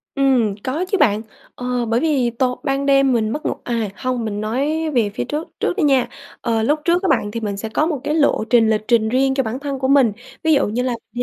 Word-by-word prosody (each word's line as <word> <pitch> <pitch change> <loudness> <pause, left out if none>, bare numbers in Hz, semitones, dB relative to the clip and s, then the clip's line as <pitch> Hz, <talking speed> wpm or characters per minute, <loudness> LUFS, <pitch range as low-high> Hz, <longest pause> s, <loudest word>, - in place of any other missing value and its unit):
Ừm, 255 -7 +2
có 305 +8 -2
chứ, 395 - +2
bạn. 215 - +3 0.3
Ờ, 250 -1 -2
bởi 230 +1 +1
vì 280 -7 +1
tối 250 +2 -1
ban 275 +1 -1
đêm 275 -2 +4
mình 220 -2 +1
mất 300 +7 -4
ngủ - - +1
à, 230 -4 -2
hông, 255 -2 -2
mình 210 -1 -3
nói 290 +8 -1
về 225 -5 +2
phía - - -1
trước 300 +3 -4
trước - - 0
đi 350 - +1
nha. 270 -3 +3 0.3
Ờ, 225 -1 0
lúc 295 +5 +1
trước 350 +2 +2
á, - - +1
bạn, 205 - +1
thì 230 - -4
mình 205 -2 -3
sẽ 220 +2 -5
có 300 +7 +1
một 310 -5 -2
cái 300 - -1
lộ 285 -7 +2
trình, 230 -2 +4
lịch 215 0 0
trình 225 -3 +3
riêng 265 +2 +2
cho 270 - +1
bản 230 +4 -4
thân 280 -2 -4
của 265 - 0
mình. 270 -5 +4 0.3
Ví 320 -1 +4
dụ 275 - +3
như 230 +4 -1
là 255 - -1 0.2
mình 245 - -3
255 Hz, 260 wpm, -20 LUFS, 225-280 Hz, 0.3 s, đêm